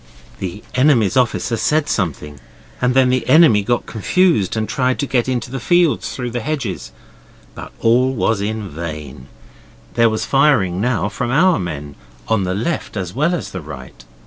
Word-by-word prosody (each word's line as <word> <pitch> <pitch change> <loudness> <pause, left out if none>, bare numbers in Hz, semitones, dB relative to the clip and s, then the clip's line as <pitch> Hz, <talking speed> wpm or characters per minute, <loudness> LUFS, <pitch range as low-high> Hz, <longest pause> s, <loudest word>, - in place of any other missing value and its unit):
The 95 +2 -6
enemy's 125 -6 +3
officer 120 -2 +1
said 155 +5 +1
something, 75 - -3 0.4
and 125 0 +1
then 130 -1 +4
the 130 0 0
enemy 155 -11 +6
got 120 +4 -1
confused 120 - +1
and 110 0 -1
tried 130 -3 0
to - - -1
get 130 -2 0
into 125 -1 -2
the 135 - -4
fields 170 +4 +2
through 125 -2 -4
the 120 - -2
hedges. 110 - -4 0.6
But - - -9
all 125 +3 +3
was 110 -3 0
vain. 80 -10 -6 0.7
There 115 -1 +4
was 110 0 -2
firing 125 -11 +2
now 115 -3 0
from 120 +3 -4
our 170 +7 +3
men, 75 -5 -5 0.3
on 105 -4 +1
the 90 0 -2
left 115 +1 -3
as 90 -2 -4
well 155 +7 +1
as 170 - -6
the 90 - -6
right. 65 -5 -11
115 Hz, 170 wpm, -18 LUFS, 95-130 Hz, 0.7 s, enemy